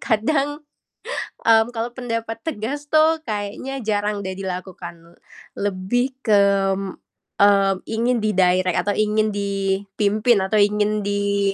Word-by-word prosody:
kadang, 285 +6 0 0.8
mmm, 225 0 +5
kalau 230 +1 -2
pendapat 230 -2 -4
tegas 285 +1 -4
tuh 315 +1 +4
kayaknya 215 +5 -4
jarang 205 -1 -1
deh 190 0 -4
dilakukan, 180 -3 -7 0.4
lebih 205 +7 -1
ke, 210 -3 +4 1.0
mmm, 200 -1 +5
ingin 235 +2 0
di-direct 185 -3 +2
atau 205 - +2
ingin 215 0 +2
dipimpin 200 +2 0
atau 205 +3 0
ingin 210 +1 +2
di 200 -1 0
210 Hz, 110 wpm, -21 LUFS, 195-230 Hz, 1.0 s, mmm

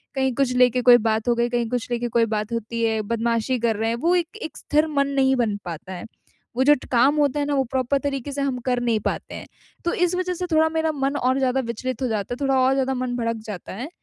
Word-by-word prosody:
कहीं 265 -1 +1
कुछ 270 -2 +1
लेके 250 0 +4
कोई 245 0 +8
बात 220 0 -1
हो 240 - +3
गई, 235 +1 +1
कहीं 240 -1 -1
कुछ 245 -1 -3
लेके 240 0 -1
कोई 230 0 +3
बात 215 0 -3
होती 230 0 -3
है। 220 -1 +1
बदमाशी 230 +3 -1
कर 230 -1 +1
रहे 220 +2 -1
हैं, 230 - 0
वो 335 +9 +1
एक 350 +4 -2
एक 315 - -6
स्थिर 305 +2 +1
मन 280 -2 +1
नहीं 265 -1 +3
बन 230 -5 0
पाता 175 +2 -7
है। 180 - -7 0.5
वो 260 - +4
जो 295 +2 +6
ट - - -10
काम 265 +4 +4
होता 290 -1 +2
है 290 - 0
ना 290 - -1
वो 270 - +2
प्रॉपर 260 +1 +1
तरीके 275 0 -3
से 280 - -3
हम 275 -2 -1
कर 250 -1 +1
नहीं 230 -2 +1
पाते - - -3
हैं। - - -8 0.4
तो 345 - +1
इस 355 0 +1
वजह 365 0 -1
से 360 +1 -4
थोड़ा 315 0 +4
मेरा 320 0 0
मन 275 -1 -1
और 260 0 +1
ज़्यादा 260 0 +1
विचलित 255 +2 -4
हो 260 - +1
जाता 215 -1 -2
है, 245 - -5
थोड़ा 270 -1 +2
और 260 +1 +4
ज़्यादा 265 -1 0
मन 250 -1 -2
भड़क 230 -1 -1
जाता 205 -4 -7
है। 245 +10 -6
255 Hz, 270 wpm, -23 LUFS, 230-280 Hz, 0.5 s, कोई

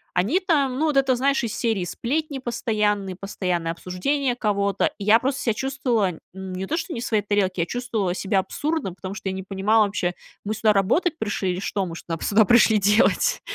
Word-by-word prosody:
они 220 - +2
там, 280 -8 +1
ну, 320 - +2
вот 295 - +1
это, 265 -2 +3
знаешь, 270 +1 +1
из 225 - -3
серии 220 -7 0
сплетни 280 - -2
постоянные, 210 -5 -1
постоянные 180 -4 -2
обсуждения 240 - -1
кого-то. 200 -3 +1
И 200 - -6
я 220 +2 +6
просто 270 +2 -1
себя 230 - +1
чувствовала 235 - -1
не 190 0 -5
то 320 - -2
что 340 - -4
не 235 - -4
в 240 - -4
своей 215 -2 +1
тарелке, 195 -3 0
я - - +1
чувствовала 225 -7 -2
себя 195 0 +1
абсурдно, 290 - -2
потому 190 +1 -7
что 200 -1 -4
я 190 - -3
не 190 - -5
понимала 205 +3 +2
вообще, 180 -3 -2 0.3
мы 215 +1 -2
сюда 215 0 +3
работать 305 - +1
пришли 205 -3 -1
или 180 - -4
что 195 0 -2
мы 165 -1 -6
шнап 165 -1 -6
сюда 215 +1 +4
пришли 220 0 +5
делать? 210 - +3
210 Hz, 205 wpm, -23 LUFS, 190-255 Hz, 0.3 s, я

